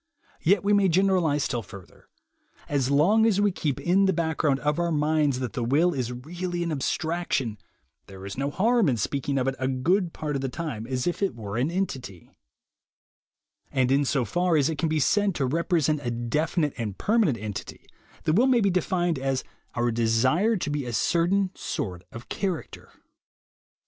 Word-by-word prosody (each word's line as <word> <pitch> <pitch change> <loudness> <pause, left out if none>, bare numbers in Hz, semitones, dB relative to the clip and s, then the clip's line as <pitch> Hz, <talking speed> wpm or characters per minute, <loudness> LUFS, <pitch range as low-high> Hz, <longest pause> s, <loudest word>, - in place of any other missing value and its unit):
Yet 190 +3 +3
we 205 +1 +2
may 200 -2 +4
generalize 175 -5 +2
still 120 -3 -1
further. 100 -4 -14 0.6
As 135 -3 0
long 195 +11 +4
as 205 -3 +2
we 205 0 +3
keep 150 -6 -2
in 190 +3 +3
the 190 - +2
background 160 -4 0
of 150 +2 0
our 170 0 0
minds 150 -3 +1
that 125 - -3
the 125 -5 -2
will 155 +9 +2
is 125 -4 -2
really 175 +7 -4
an 170 - -2
abstraction, 150 - -1 0.5
there 95 -1 -10
is 100 - -6
no 140 +2 -1
harm 220 +3 +2
in 125 - 0
speaking 140 +5 -1
of 130 0 0
it 135 - +1
a 130 - 0
good 170 +8 +1
part 150 -3 -4
of 135 - -1
the 135 - -2
time 125 -7 -5
as 130 -1 -2
if 175 - -2
it 195 - 0
were 105 -3 -6
an 125 +6 +1
entity; 130 - -4 1.4
and 130 -1 +1
insofar 145 - +1
as 145 +1 +2
it 155 - -5
can 165 - +1
be 155 0 +1
said 200 +6 +2
to 135 - 0
represent 155 0 +1
a 120 - -1
definite 150 +6 -1
and 105 -4 -4
permanent 210 - +2
entity, 105 -1 -7 0.4
the 155 - +1
will 235 +9 +4
may 255 -2 +4
be 200 -3 +2
defined 175 -3 0
as 135 0 -1 0.3
our 120 0 +1
desire 130 - +2
to 155 -5 -3
be 145 -1 -1
a 120 -1 -5
certain 180 - +1
sort 90 -3 -4
of 115 +1 -10
character. 185 -5 -4
150 Hz, 185 wpm, -26 LUFS, 130-175 Hz, 1.4 s, may